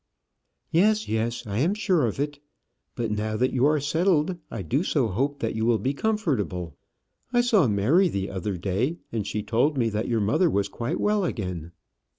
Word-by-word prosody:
"Yes, 210 +6 +3
yes, 115 +2 -2
I 105 0 -2
am 175 +9 +2
sure 185 - +2
of 110 - -4
it. 145 0 -2 0.6
But 115 -3 -2
now 110 +1 -1
that 130 +2 +1
you 130 +2 +3
are 150 0 +3
settled, 165 +3 +1
I 110 -4 -5
do 135 - 0
so 135 - +1
hope 140 +8 -1
that 115 - -1
you 110 - -1
will 115 0 +3
be 130 +7 -1
comfortable. 130 - -1 0.6
I 245 -1 +4
saw 220 - +4
Mary 120 - +3
the 100 -5 -3
other 95 0 -3
day, 100 - -1
and 110 -3 -2
she 105 - -2
told 130 +7 +1
me 115 -3 +2
that 105 +1 -2
your 115 -2 +1
mother 115 - +3
was 100 -7 +1
quite 115 +4 -3
well 210 -1 +2
again." 90 - -4
120 Hz, 190 wpm, -25 LUFS, 105-160 Hz, 0.6 s, I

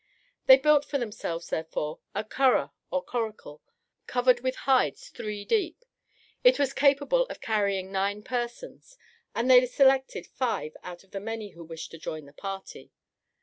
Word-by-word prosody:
They 260 - +10
built 295 +1 +4
for 285 - -2
themselves 205 -8 -5
therefore 160 -1 -3 0.2
a 205 - -1
curragh 260 +4 +2 0.2
or 275 - -1
coracle, 220 -11 -5 0.5
covered 250 0 +3
with 255 +1 -2
hides 265 -2 +2
three 210 -3 -6
deep. 395 - -1 0.6
It - - +6
was 275 -1 +1
capable 285 - +3
of - - -8
carrying 200 -5 -1
nine 200 +2 -1
persons, 255 - -5 0.4
and 235 +2 0
they 255 -1 +8
selected 265 +1 +3
five 230 -11 -3
out 175 0 -9
of 195 - -27
the 195 - -4
many 220 0 -5
who 170 - -12
wished 165 0 -8
to 165 - -10
join 155 -1 -6
the 140 - -16
party. 195 +4 -8
235 Hz, 155 wpm, -27 LUFS, 195-270 Hz, 0.6 s, They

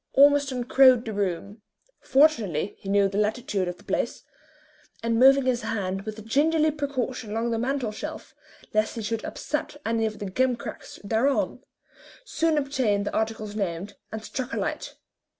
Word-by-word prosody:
Ormiston 280 -2 +4
crowed 255 -1 +5
the 220 - -4
room 200 +1 -3 0.4
fortunately 230 - +2
he 195 - -8
knew 200 0 +4
the 195 +1 -2
latitude 210 -3 0
of 180 0 -4
the - - -18
place - - -2 0.8
and 230 0 +1
moving 270 +1 +6
his 250 -2 +1
hand 195 -1 -3
with 215 0 -6
gingerly 310 +6 +3
precaution 260 -5 -3
along 225 +2 -1
the 230 - 0
mantel 255 -2 -1
shelf, 215 - -7 0.4
lest 215 +2 +1
he 225 - -4
should 220 +1 -2
upset 300 -1 -4
any 225 0 +1
of 215 0 -6
the 205 - -5
gimcracks 245 +5 -2
thereon, 230 +7 0 0.6
soon 325 -8 +1
obtained 260 -8 +1
the - - -3
articles 215 -1 -2
named, 195 -1 -3 0.2
and 220 0 -6
struck 260 -1 -4
a - - -1
light. - - -3
225 Hz, 160 wpm, -26 LUFS, 205-265 Hz, 0.8 s, moving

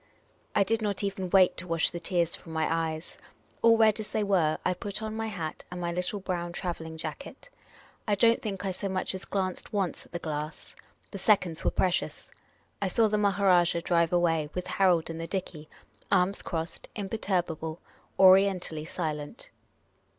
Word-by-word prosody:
I 200 - +5
did 225 +3 0
not 205 -2 -1
even 195 -2 -2
wait 185 0 +5
to 180 - -4
wash 165 -1 +1
the 175 - -5
tears 170 -1 0
from 165 - -11
my 160 0 +1
eyes. 160 -1 -3 0.4
All 230 0 +6
red 220 -1 +4
as 215 - -6
they 215 - 0
were, 175 -6 +2
I - - +3
put 200 +4 -5
on 220 0 -4
my 225 0 -2
hat 170 -8 -5
and 180 - -6
my 170 -1 -2
little 180 +4 -1
brown 175 -2 -3
travelling 165 -3 -5
jacket. 170 - -8 0.6
I 205 - +3
don't 230 +3 +4
think 195 -3 -4
I 190 - 0
so 195 +2 -4
much 185 0 -1
as 190 - -6
glanced 190 0 -3
once 195 -4 -2
at - - -32
the 175 - -3
glass. 155 -2 -5 0.4
The 200 - -6
seconds 180 -5 +2
were - - +3
precious. 185 -1 -1 0.5
I 200 - +1
saw 220 +4 +3
the 210 0 +1
Maha 200 -1 +1
rajah 175 -2 +4
drive 170 -2 +2
away, 165 -4 +2
with 180 - -3
Harold 175 -4 +2
in 165 - -6
the 165 - -4
dickey, 165 -4 -5 0.4
arms 185 +1 +3
crossed, 165 0 -4
imperturbable, 175 -6 -2 0.4
Orientally 185 -4 +5
silent. 160 - -5
180 Hz, 180 wpm, -28 LUFS, 165-200 Hz, 0.6 s, All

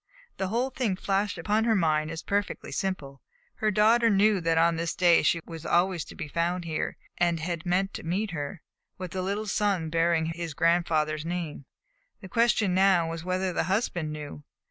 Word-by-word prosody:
The 190 - -1
whole 240 +6 -1
thing 240 -7 -1
flashed 195 +2 -1
upon 215 +2 +1
her 225 -1 +3
mind 155 -4 +1
as 165 +1 -6
perfectly 200 0 -2
simple. 145 -8 -3 0.4
Her 215 - +1
daughter 225 +3 +4
knew 205 -1 +3
that 165 0 +1
on 165 +1 +4
this 165 0 -2
day 175 -2 +5
she 170 - +2
was 165 -2 -8
always 175 -1 +1
to - - -12
be 155 - -5
found 170 +3 -1
here, 160 -2 -3 0.2
and 170 -1 +2
had 170 +1 -4
meant 190 +2 +1
to - - -6
meet 190 +5 -1
her, 160 +2 -5 0.3
with 185 -1 -6
the 185 - -3
little 200 +3 -2
son 195 -6 0
bearing 165 0 +2
his 165 -1 -5
grandfather's 160 -2 +1
name. 165 -4 -4 0.5
The 190 - -11
question 230 -4 +2
now 185 -3 +3
was 165 0 -5
whether 185 +1 -1
the - - 0
husband 180 -5 -1
knew. 150 -1 -7
175 Hz, 190 wpm, -27 LUFS, 165-195 Hz, 0.5 s, day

